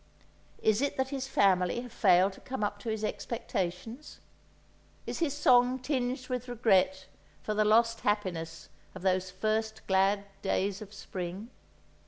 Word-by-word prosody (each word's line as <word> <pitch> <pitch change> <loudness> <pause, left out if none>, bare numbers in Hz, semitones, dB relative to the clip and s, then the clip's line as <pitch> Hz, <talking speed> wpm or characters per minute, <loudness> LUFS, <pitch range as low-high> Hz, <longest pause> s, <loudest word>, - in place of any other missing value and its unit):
Is 220 +2 +3
it 285 - -1
that 265 0 0
his 270 -1 -3
family 190 -2 +2
have 245 -1 -10
failed 190 -3 +4
to - - -14
come 265 -5 -4
up 205 0 -2
to 225 - -5
his 220 -1 -2
expectations? 220 - -4 0.9
Is - - -4
his 325 -4 +1
song 255 -3 +5
tinged 255 -1 -2
with 250 -1 -3
regret 190 -6 +2 0.4
for 215 - -2
the 215 0 +2
lost 230 +1 +4
happiness 185 -6 -2 0.3
of 185 - -9
those 185 -1 +1
first 220 +3 -2
glad 195 +1 +2 0.2
days 195 +1 -1
of 205 -2 -9
spring? 190 +2 -6
215 Hz, 150 wpm, -30 LUFS, 190-245 Hz, 0.9 s, song